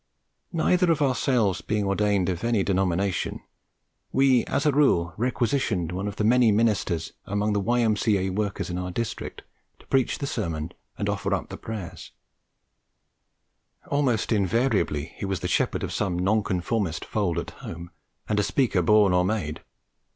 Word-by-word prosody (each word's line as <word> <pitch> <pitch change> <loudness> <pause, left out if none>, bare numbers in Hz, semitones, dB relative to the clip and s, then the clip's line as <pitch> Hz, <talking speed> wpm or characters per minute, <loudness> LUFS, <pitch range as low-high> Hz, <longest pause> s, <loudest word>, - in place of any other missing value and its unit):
Neither 180 +1 +2
of 160 - +1
ourselves 125 -6 +1
being 105 -1 -1
ordained 100 -1 +1
of 90 0 -2
any 115 -4 +2
denomination, 95 0 0 0.7
we 130 -3 +4
as 140 - -1
a 150 - +5
rule 130 - +3
requisitioned 120 - 0
one 95 +3 -3
of 100 - -4
the 105 - -1
many 120 +1 +5
ministers 100 -6 0
among 105 +1 0
the 100 - +1
Y.M.C.A. 105 -3 +1
workers 100 -2 -2
in 90 - -2
our 90 0 -3
district 115 +5 -4 0.3
to - - -20
preach 135 -2 +1
the 140 - -3
sermon 85 - -3 0.3
and - - -2
offer - - -2
up - - -5
the - - -6
prayers: 110 -5 -7 1.8
almost 135 -7 +1
invariably 100 - +1
he - - -4
was 95 -1 -2
the 90 - -2
shepherd 90 - 0
of - - -3
some 95 -4 -1
Nonconformist 95 -2 0
fold 95 -6 -1
at 85 - -3
home, 85 +1 -9 0.4
and 105 -1 +1
a - - +2
speaker 130 +3 +1
born 105 -3 +4
or 90 0 +4
made. 90 -6 -2
105 Hz, 155 wpm, -25 LUFS, 90-115 Hz, 1.8 s, a